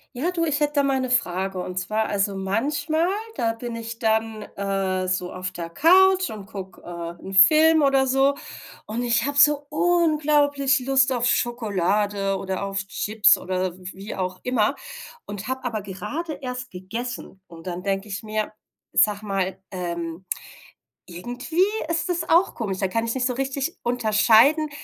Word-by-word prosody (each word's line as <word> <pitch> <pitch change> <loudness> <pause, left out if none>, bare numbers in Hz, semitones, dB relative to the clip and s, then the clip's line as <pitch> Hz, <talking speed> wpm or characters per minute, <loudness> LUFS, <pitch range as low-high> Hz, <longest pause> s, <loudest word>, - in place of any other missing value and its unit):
Ja, 300 +8 -1
du, 335 -2 -1
ich 295 -2 0
hätte 295 0 0
da 285 - +2
mal 270 -1 +1
'ne 255 - -2
Frage 190 -5 0
und 180 0 -3
zwar 215 +4 -1
also 200 -1 0
manchmal, 285 - 0 0.3
da 230 -2 0
bin 235 +1 -6
ich 230 0 -6
dann, 220 -2 0
äh, 195 -2 -2
so 180 -1 -2
auf 185 0 -4
der 170 -2 -7
Couch 370 - +5
und 210 -2 -8
guck, 195 -3 -9
äh, 170 -1 -6
'n 195 - -9
Film 310 +11 +7
oder 275 -1 +3
so, 270 +2 +3 0.5
und 225 +3 -4
ich 235 -1 +1
habe 285 0 0
so 290 0 +5
unglaublich 300 -4 +2
Lust 265 0 +3
auf 245 -2 +1
Schokolade 205 -4 0
oder 190 -1 -4
auf 195 0 -3
Chips 210 +2 +3
oder 185 -1 -2
wie 190 +3 -8
auch 185 -1 -3
immer 250 0 +1 0.5
und 205 0 -7
habe 260 0 -3
aber 225 -3 -2
gerade 210 - -5
erst 250 0 -5
gegessen. 205 +2 -6
Und 165 -1 -13
dann 180 0 -4
denke 195 +1 -2
ich 200 -1 -5
mir: 215 0 -3 0.4
„Sag 210 0 +3
mal, 195 -2 -2
ähm, 170 -1 -5 0.8
irgendwie 245 - -3 0.3
ist 335 +2 -1
das 345 -2 -1
auch 345 +4 +4
komisch.“ 195 -5 -3
Da 195 - +1
kann 225 +5 -1
ich 230 - -1
nicht 250 -1 0
so 250 - -1
richtig 270 +4 -3
unterscheiden, 240 +6 +4
220 Hz, 165 wpm, -23 LUFS, 195-275 Hz, 0.8 s, Film